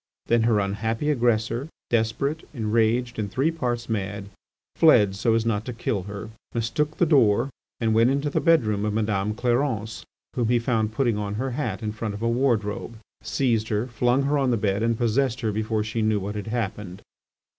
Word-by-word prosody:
Then 120 0 +3
her 110 -2 +3
unhappy 110 +8 -1
aggressor, 120 +1 0 0.2
desperate, 120 +7 0
enraged, 115 +1 +1
and 105 -2 -2
three 135 +10 +1
parts 120 -7 -2
mad, 100 -2 -3 0.5
fled 105 -12 +5
so 115 +3 +2
as 115 0 +1
not 110 -2 0
to 125 - -4
kill 115 -3 -2
her, 105 +2 -7 0.2
mistook 150 +7 -1
the 175 - +4
door, 130 -4 +3 0.3
went 115 +1 +3
into 140 +2 0
the - - 0
bedroom 110 - +3
of 105 -1 -1
Madame 105 -1 0
Clarence, 120 -2 -1 0.3
whom 120 -2 +1
he 120 +1 +3
found 115 -2 0
putting 115 -2 0
on 105 0 -3
her 130 +4 -2
hat 120 -5 -3
in 105 - -2
front 105 -1 -4
of 105 - -6
a - - +2
wardrobe, 115 -3 0 0.2
seized 115 -5 0
her, 105 +1 0
flung 125 +2 +1
her 145 +1 +1
on 135 -2 +2
the 120 - +2
bed, 100 -1 0
and 115 0 +1
possessed 120 +2 +1
her 110 -2 0
before 110 +1 -1
she 110 +2 -3
knew 110 -1 +2
what 100 +2 -4
had 105 0 -5
happened. 105 -5 -4
115 Hz, 190 wpm, -25 LUFS, 105-125 Hz, 0.5 s, fled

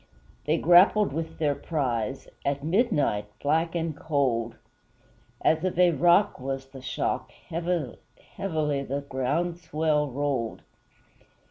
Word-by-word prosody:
They 155 +2 +2
grappled 180 +2 +5
with 160 +1 -4
their 150 -3 +1
prize, 135 -5 -2 0.2
At 140 0 -1
midnight 150 - +1
black 160 +4 +1
and 165 -2 -2
cold! 130 -7 0 0.9
As 160 +1 +3
of 185 -2 -1
a 180 -1 +5
rock 175 +5 +3
was 135 0 -4
the 135 -1 -11
shock; 130 - -2 0.2
Heavily 170 -5 -2 0.4
the 145 -6 -2
ground 165 +7 -1
swell 155 -2 0
rolled. 135 -3 -2
150 Hz, 115 wpm, -27 LUFS, 135-165 Hz, 0.9 s, grappled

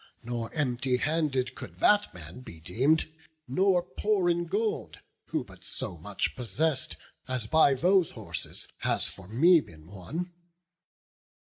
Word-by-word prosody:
Not 120 +3 -4
empty 125 -2 +1
handed 145 -3 0
could - - -9
that 210 0 +4
man 85 +5 -10
be 85 -10 -11
deem'd, 130 - +2 0.4
Nor 180 +6 +3
poor 190 0 +1
in 170 0 -1
gold, 210 +5 -1 0.3
who - - -1
but - - -16
so - - -3
much 100 +5 -3
possess'd 130 +3 0 0.3
As 130 -4 -1
by 140 +3 +5
those 180 +4 +3
horses - - -5
has - - 0
for 95 -2 -6
me 160 - +6
been 80 -2 -15
won. 120 - -6
135 Hz, 135 wpm, -29 LUFS, 115-175 Hz, 0.4 s, me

